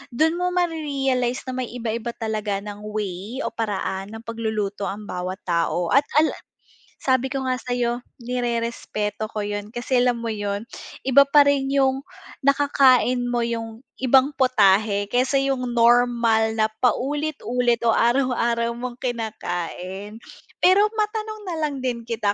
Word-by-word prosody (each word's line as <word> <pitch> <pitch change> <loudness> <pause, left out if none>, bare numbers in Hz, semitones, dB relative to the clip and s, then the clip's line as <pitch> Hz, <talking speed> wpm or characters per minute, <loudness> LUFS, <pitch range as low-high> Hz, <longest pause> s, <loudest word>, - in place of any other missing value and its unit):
Do'n 320 +4 +3
mo 360 0 0
mare-realize 275 -7 0
na - - -2
may - - -5
iba-iba 235 0 -3
talaga 215 -3 -2
ng 205 -1 -7
way 210 +4 -4
o - - -2
paraan 205 -2 -3
ng 225 - -9
pagluluto 220 -3 -3
ang 205 +2 -5
bawat 180 +2 -4
tao. 170 0 0
At 280 +2 +5 0.2
al 315 - +3 0.7
sabi 260 0 +1
ko 265 -1 -3
nga 255 -1 -1
sa'yo, 245 -1 -1 0.2
nirerespeto 230 -3 -2
ko 210 -1 -3
yun 205 0 -4
kasi 245 +1 0
alam 245 -1 +2
mo 230 -1 -3
yun? 205 +1 -3 0.4
Iba 275 +1 +6
pa 290 0 +7
rin 275 -1 +2
yung, 270 -1 +2 0.4
nakakain 270 -3 +4
mo 240 -1 0
yung 230 +1 -5 0.2
ibang 265 +2 +4
putahe, 205 -5 +3
kaysa 250 +5 +1
yung 255 -3 -1
normal 230 -2 +3
na 215 - +4 0.2
paulit-ulit 250 -3 0
o 230 - +4
araw-araw 235 -2 +1
mong 240 0 -6
kinakain. 205 -4 -4 0.4
Pero 400 +4 +5
matanong 430 0 -2
na 350 -3 -3
lang 290 -3 -1
din 240 -2 -1
kita 225 -3 -1
240 Hz, 140 wpm, -23 LUFS, 215-265 Hz, 0.7 s, pa